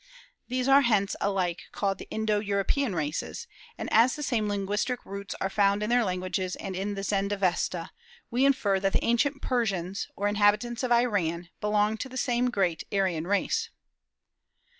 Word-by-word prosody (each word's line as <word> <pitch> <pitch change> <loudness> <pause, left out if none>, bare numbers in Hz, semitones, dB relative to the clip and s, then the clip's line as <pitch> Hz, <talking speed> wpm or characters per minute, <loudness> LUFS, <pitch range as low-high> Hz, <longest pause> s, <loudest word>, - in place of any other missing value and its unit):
These 255 +1 -1
are 275 +1 +7
hence 210 -6 +2
alike 185 -4 -1
called 195 -2 -1
the - - -10
Indo 220 -1 0
European 205 +3 0
races; 155 - -3 0.3
and - - -4
as 230 +4 +5
the 295 - -5
same 225 -6 0
linguistic 205 +5 -1
roots 200 0 -6
are - - 0
found 200 +1 +2
in 215 - -1
their 245 0 +4
languages 185 -1 -2
and 190 - -6
in 200 +2 -2
the 195 - -4
Zend 200 0 0
Avesta, 180 -3 -1 0.4
we 245 +3 +2
infer 210 -8 +3
that 195 0 0
the - - +1
ancient 275 +5 +1
Persians, 195 -7 -1
or 205 - 0
inhabitants 210 +3 +2
of 255 -2 -2
Iran, 185 -8 +1
belonged 210 +1 +1
to 260 - -4
the 260 - -7
same 245 -1 +1
great 185 -8 0
Aryan 185 -5 0
race. 455 - 0
205 Hz, 170 wpm, -28 LUFS, 195-240 Hz, 0.4 s, are